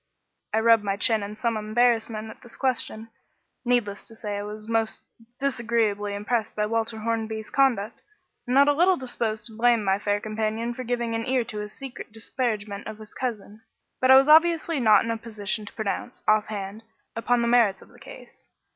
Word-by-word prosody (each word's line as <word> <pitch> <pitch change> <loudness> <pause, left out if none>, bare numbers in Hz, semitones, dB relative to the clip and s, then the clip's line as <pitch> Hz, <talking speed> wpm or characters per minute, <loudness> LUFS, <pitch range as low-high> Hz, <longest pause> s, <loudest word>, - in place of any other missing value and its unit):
I 220 - +2
rubbed 225 -1 +5
my 200 -1 -1
chin 220 +1 +2
in 205 +1 -6
some 230 +1 -1
embarrassment 220 0 +1
at - - -15
this 240 - -9
question. 230 -4 -2 0.5
Needless 240 -5 0
to 225 - -13
say, 210 -2 -5
I 205 - -3
was 210 +1 -7
most 225 -1 -1 0.4
disagreeably 225 -6 0
impressed 215 +2 -2
by 210 - 0
Walter 225 +1 -1
Hornby's 220 -1 -3
conduct, 250 -7 +1 0.5
and 250 - 0
not 280 +1 +6
a 290 - +5
little 355 +5 +4
disposed 225 -5 -2
to 220 - -5
blame 235 -1 +3
my 195 0 +1
fair 205 0 0
companion 220 +2 -2
for 255 - -6
giving 235 -1 -2
an 225 0 -2
ear 255 -1 +2
to 215 -2 -6
his 210 0 -6
secret 270 -4 -8
disparagement 215 -3 -3
of 215 -1 -7
his 215 -1 -12
cousin; 220 -4 -5 0.4
but 255 - +2
I 265 - +10
was 270 +1 +6
obviously 325 0 +5
not 220 -2 +5
in 230 - -1
a 230 - -2
position 215 -2 -3
to - - -10
pronounce, 220 +3 -4
offhand, 215 -1 0 0.3
upon 235 +1 +1
the - - +1
merits 235 -5 +3
of - - -20
the - - -19
case. - - -14
225 Hz, 190 wpm, -25 LUFS, 215-245 Hz, 0.5 s, I